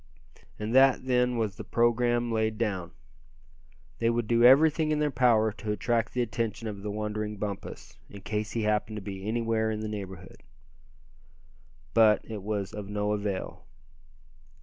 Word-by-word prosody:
And 105 +2 -4
that, 130 0 +5
then, 125 -1 +2
was 110 -4 -1
the - - -6
programme 120 0 +1
laid 110 -1 0
down. 95 -6 -2 1.1
They 115 - +2
would 120 0 0
do 115 +1 +2
everything 155 +5 +6
in 155 - +1
their 150 -1 +1
power 115 -4 +3
to 105 +1 -5
attract 115 +2 -1
the 125 - +1
attention 115 -1 -3
of 100 -2 -6
the 105 - -4
wandering 105 0 -3
Bumpus, 100 -1 -6
in 100 - -11
case 105 +2 -3
he 115 - -1
happened 105 0 0
to - - -5
be 95 0 -6
anywhere 115 -1 0
in 110 -1 -3
the 110 - -3
neighborhood. 95 -3 -8 1.5
But 110 -2 +5
it 110 -3 -6
was 100 -1 -3
all 105 - -5
of 100 -1 -8
no 105 0 -1
avail. 100 -5 -3
110 Hz, 165 wpm, -28 LUFS, 105-120 Hz, 1.5 s, everything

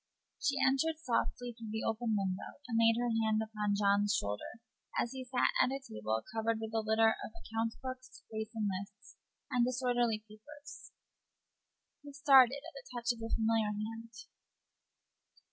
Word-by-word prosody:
She 280 - +2
entered 275 +4 +2
softly 245 -3 -1
at 230 -1 -10
the 220 +1 -3
open 225 0 0
window, 190 -1 -3
and 230 -2 +1
laid 230 0 +5
her 240 -1 +1
hand 220 0 +2
upon 210 -2 -1
John's 200 0 +3
shoulder 105 - -3 0.4
as 235 - +1
he 260 -1 -5
sat 250 0 +2
at - - +4
a 270 +1 -2
table 110 - -3
covered 225 0 0
with 220 0 -5
a 225 - +2
litter 220 +1 +4
of - - -6
account 225 0 -3
books, 255 0 -7
racing 220 0 -2
lists, 200 +1 -14 0.3
and 250 -2 +3
disorderly 245 -3 +1
papers. 290 +8 -12 1.1
He 290 -1 -11
started 275 -1 +6
at 335 - -10
the 275 -2 -11
touch 240 -1 0
of 240 - -6
the 225 0 -5
familiar 225 -1 +2
hand. 225 +2 -5
225 Hz, 160 wpm, -33 LUFS, 215-255 Hz, 1.1 s, started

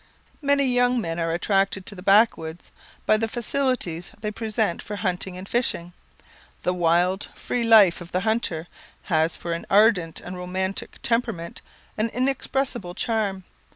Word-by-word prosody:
Many 280 -1 +3
young 245 -1 +3
men 165 -5 -3
are 165 0 0
attracted 195 +2 +1
to - - -6
the 185 - -10
Backwoods 195 -5 +2 0.3
by 215 - +4
the 225 +1 -1
facilities 240 -8 -1
they 210 0 -3
present 220 -3 -1
for 210 - -6
hunting 185 -2 -2
and 185 +1 -8
fishing. 175 -8 -1 0.7
The 180 - +1
wild, 180 +2 +2
free 245 - -2
life 215 -7 +6
of 170 - -10
the 185 - 0
hunter, 220 -7 -1 0.4
has 160 -2 +1
for 170 - -6
an 170 - -5
ardent 195 -6 +4
and 180 - -8
romantic 185 +2 -3
temperament 230 -8 -1 0.4
an 220 +2 +1
inexpressible 255 -6 -1
charm. 205 -4 -1
195 Hz, 150 wpm, -24 LUFS, 175-230 Hz, 0.7 s, life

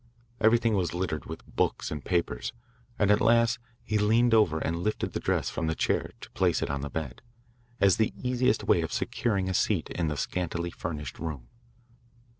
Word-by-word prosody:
Everything 115 +1 +4
was 90 -4 0
littered 85 -4 -2
with - - -8
books - - -1
and 75 -2 -4
papers, 85 - -1 0.4
and 105 -1 +3
at 105 - +4
last 115 +2 +4 0.2
he 110 -1 0
leaned 115 +3 +4
over 105 -8 +4
and 80 +1 -1
lifted 105 +3 -2
the - - -1
dress - - 0
from 80 - -2
the 80 - 0
chair - - 0
to - - -10
place - - +1
it - - -2
on 70 -1 -2
the 70 - -4
bed, 70 -4 -5 0.6
as 100 -3 +5
the 110 - +2
easiest 125 -1 +1
way 85 - +3
of 80 - -3
securing 100 -6 -1
a 95 - -1
seat - - +1
in 85 -2 -1
the 75 -1 -2
scantily 85 0 -2
furnished 75 -5 -5
room. 75 -7 -5
90 Hz, 190 wpm, -28 LUFS, 80-110 Hz, 0.6 s, as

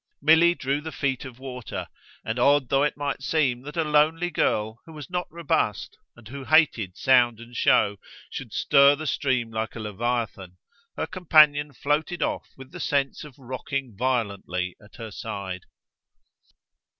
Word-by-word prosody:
Milly 165 +3 +5
drew 140 0 -2
the 160 +1 -6
feet 135 -1 -2
of 130 -2 -10
water, 125 -2 -6 0.4
and 110 +2 -2
odd 140 0 +3
though 135 0 +3
it 150 0 0
might 145 -2 -3
seem 135 -4 +1
that 150 +4 -9
a 165 - +2
lonely 155 +3 +2
girl, 110 -6 0
who 160 - -11
was 150 +1 -10
not 180 0 -2
robust 160 -10 -1 0.2
and 120 -2 -15
who 135 +3 -8
hated 130 - +3
sound 120 -3 +4
and 120 +1 -12
show, 100 -3 +3 0.3
should 130 -5 -7
stir 140 +4 +5
the 155 +2 -7
stream 130 -4 0
like 110 0 -3
a - - -6
leviathan, 105 -4 -3 0.4
her - - -1
companion 150 -5 +4
floated 150 +5 -1
off - - -3
with 135 0 -12
the 180 - -9
sense 140 -3 -1
of 150 -4 -13
rocking 130 -1 -5
violently 100 -7 -2
at 105 - -18
her 115 -2 -8
side. 100 -4 -6
130 Hz, 160 wpm, -25 LUFS, 115-150 Hz, 0.4 s, Milly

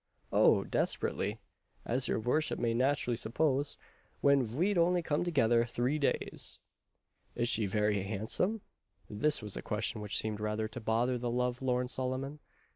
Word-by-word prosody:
"Oh! - - +5
desperately, 105 +3 -1 0.5
as 125 +1 +1
your - - 0
vorship 125 +8 0
may 115 -1 0
natt'rully 130 0 +1
suppose, 135 +5 0 0.4
when 140 -1 +4
ve'd 160 - 0
only 175 0 +3
come 150 0 0
together 120 -9 +3
three 120 +5 -1
days." 140 - -2 0.8
"Is 120 0 0
she 110 -3 +2
very 105 0 +1
handsome?" 110 - -1 0.5
This 145 +5 +1
was 105 -2 -3
a - - -4
question 105 +1 -2
which 105 -1 -1
seemed 110 -1 -1
rather 105 +1 -1
to 110 - -8
bother 120 +3 +1
the 120 0 -2
love 125 +1 -1
lorn 125 -1 0
Solomon. 130 +4 -3
125 Hz, 150 wpm, -32 LUFS, 110-140 Hz, 0.8 s, Oh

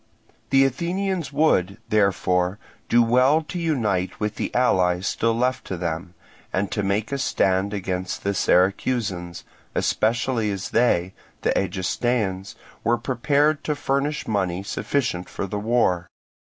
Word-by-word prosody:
The 135 0 +5
Athenians 175 +4 -1
would, 110 - +2
therefore, 95 -3 +2 0.3
do 120 0 +5
well 130 +7 +4
to 175 +3 -5
unite 110 - -1
with 105 0 -1
the - - -2
allies 95 -7 +2
still 115 +2 +1
left 125 +2 0
to 95 - -4
them, 85 +1 -4 0.4
and 95 +1 -1
to 105 - -1
make 100 +4 -1
a 140 - -1
stand 95 -6 +1
against 95 -2 -3
the 100 - 0
Syracusans; 95 -1 +1 0.3
especially 115 0 +1
as 100 -2 -4
they, 95 -6 +2 0.3
the - - +2
Egestaeans, 95 +1 -1 0.3
were 120 +1 +2
prepared 145 +5 +1
to 150 - 0
furnish 145 +2 -1
money 95 -3 -1
sufficient 100 -4 -2
for - - -4
the 105 +2 -4
war. 100 -6 +1
105 Hz, 135 wpm, -23 LUFS, 95-130 Hz, 0.4 s, The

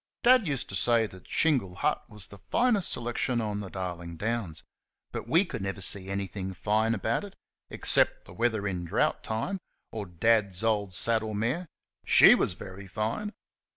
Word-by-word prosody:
Dad 245 -4 +6
used 140 -4 -2
to 95 - -5
say 115 +4 +3
that 95 -3 -12
Shingle 130 - +1
Hut - - 0
was 105 -3 -3
the 100 - -12
finest 235 -7 +2
selection 120 +1 -1
on 105 -2 -2
Darling 90 -4 -6
Downs; 105 -6 -3 0.5
but - - -5
WE 165 +10 +4
never 100 - -4
could 95 - -6
see 95 -1 0
anything 95 -1 -4
fine 110 +5 +1
about 110 - -1
it 200 -1 -10 0.3
except - - +2
the - - -12
weather 110 -1 0
in 90 -3 -3
drought 85 - 0
time, 115 - -2 0.3
or 105 -3 -5
Dad's 100 +2 +1
old 105 -4 0
saddle 110 0 +1
mare. 125 - -1 0.4
SHE - - +8
was - - +2
very 95 +2 -10
fine. 110 - -2
105 Hz, 165 wpm, -28 LUFS, 95-120 Hz, 0.5 s, SHE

